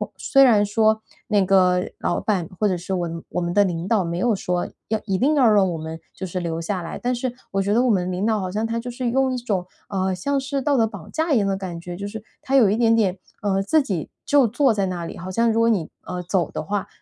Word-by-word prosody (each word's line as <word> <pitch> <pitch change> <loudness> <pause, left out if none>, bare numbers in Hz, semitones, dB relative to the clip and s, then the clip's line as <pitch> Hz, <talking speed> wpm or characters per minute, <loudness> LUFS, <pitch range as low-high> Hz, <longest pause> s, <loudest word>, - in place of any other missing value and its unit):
虽 275 - +3
然 215 -5 +5
说 220 +1 +2 0.3
那 205 -3 +3
个 180 -1 +4 0.2
老 - - 0
板 185 -6 0
或 210 - +3
者 180 - 0
是 185 +3 -5
我 170 -2 -3
我 180 - -2
们 175 0 -2
的 205 - +5
领 170 -1 -3
导， 210 -4 +2
没 170 +1 -3
有 230 +4 +2
说 180 -1 -1 0.2
要 220 - 0
一 195 -3 0
定 290 +7 +2
要 255 -5 +5
让 195 -3 +4
我 165 - -3
们 160 +1 -6
就 190 - -6
是 180 +1 -4
留 165 -1 -3
下 180 +2 -2
来， 165 - -6
但 250 +1 -1
是 245 0 -2 0.2
我 195 0 +1
觉 200 +2 0
得 240 +3 +3
我 255 - +2
们 185 -4 +1
领 185 +3 -1
导 220 -2 +2
好 185 -1 -3
像 215 +4 -1
他 230 +1 -2
就 245 +1 -6
是 245 0 -2
用 265 0 +2
一 - - -1
种， 200 -7 -2 0.2
呃， 190 -2 0
像 275 +10 -1
是 275 0 -2
道 285 -1 +2
德 225 -1 +3
绑 200 -7 -10
架 320 -1 0
一 235 - +4
样 200 - +1
的 195 -1 0
感 180 -3 -6
觉。 175 0 -7
就 200 +1 -5
是 220 +1 -7 0.2
他 270 - -1
有 225 -7 +6
一 210 - +1
点 230 -1 +4
点 195 -4 +1 0.2
呃， 195 -2 +1
自 310 +9 +3
己 185 - -3 0.2
就 280 -4 +4
坐 260 +2 +2
在 200 -2 0
那 175 -2 -3
里， - - -7
好 185 +2 -7
像 230 +4 +2
如 225 - +1
果 230 - +4
你， 190 -8 0 0.2
呃， 180 -1 -5
走 175 -3 0
的 - - -4
话， 200 +4 -2
200 Hz, 295 characters per minute, -22 LUFS, 180-230 Hz, 0.3 s, 有